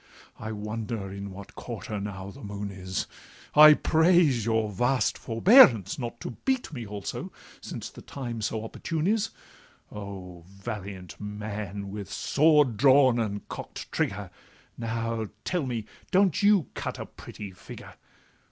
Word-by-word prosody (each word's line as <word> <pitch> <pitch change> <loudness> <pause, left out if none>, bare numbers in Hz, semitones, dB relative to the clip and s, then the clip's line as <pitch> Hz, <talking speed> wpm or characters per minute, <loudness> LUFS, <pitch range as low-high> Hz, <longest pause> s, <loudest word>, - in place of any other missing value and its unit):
I 110 -1 -5
wonder 105 -1 -4
in 100 0 -6
what 95 +1 -10
quarter 105 - -6
now 100 -1 -6
the - - -13
moon 100 0 -5
is: 95 -1 -3 0.5
I 150 0 +10
praise 160 - +4
your 110 -2 +1
vast 125 +3 +1
forbearance 115 - +6
not 120 -1 -5
to - - -4
beat 260 -10 0
Me 120 -5 -5
also, 100 -1 -5 0.3
since - - -6
the - - -12
time 120 -5 -6
so 110 +1 -2
opportune 160 +7 -3
is— 220 +2 +2 0.6
O, 95 -4 -8
valiant 100 -2 -7
man! 105 -1 -5
with 100 -1 -6
sword 150 -2 +3
drawn 130 -1 +6
and 105 -3 -3
cock'd - - -7
trigger, - - -2 0.4
Now, 115 -1 -2 0.2
tell 175 -7 -1
me, 115 -4 -3 0.2
don't 190 -2 +3
you 200 -6 +5
cut - - -4
a - - -5
pretty 100 -2 -9
figure? 95 - -11
110 Hz, 140 wpm, -27 LUFS, 100-135 Hz, 0.6 s, I